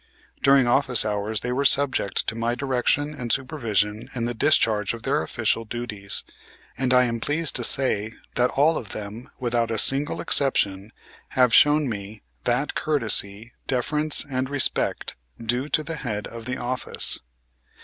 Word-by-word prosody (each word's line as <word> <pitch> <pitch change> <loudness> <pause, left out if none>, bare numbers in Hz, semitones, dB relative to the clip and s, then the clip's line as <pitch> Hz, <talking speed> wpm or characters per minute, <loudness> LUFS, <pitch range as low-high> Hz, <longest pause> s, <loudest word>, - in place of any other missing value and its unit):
During 135 -1 +5
office 125 -1 +3
hours 105 +1 -1
they 125 - -3
were 135 +3 0
subject 140 -7 +2
to - - -1
my 115 +1 -1
direction 140 +3 0
and 125 -5 -4
supervision 115 -6 -1
in 120 -2 -1
the 120 - -2
discharge 115 -6 +2
of 115 - -11
their 135 - +1
official 115 -1 0
duties, 105 -4 -3 0.5
and 130 0 0
I 125 0 +6
am 115 -1 -1
pleased 150 +5 0
to - - -4
say 115 -5 +2 0.2
that 125 +1 +2
all 155 +4 +3
of 105 -6 -7
them, 105 +3 -7
without 120 -2 0
a 115 - -1
single 135 +6 0
exception, 105 -7 0 0.5
have 125 -3 +4
shown 150 +2 +5
me 105 -2 -6 0.2
that 125 +4 0
courtesy, 115 -6 -1
deference 150 +4 0
and 130 -1 -2
respect 145 -2 0 0.2
due 120 +5 -1
to 155 - +2
the 165 +1 -5
head 105 -7 -4
of 115 -1 -9
the 125 +2 -3
office. 125 +1 0
120 Hz, 160 wpm, -24 LUFS, 110-140 Hz, 0.5 s, I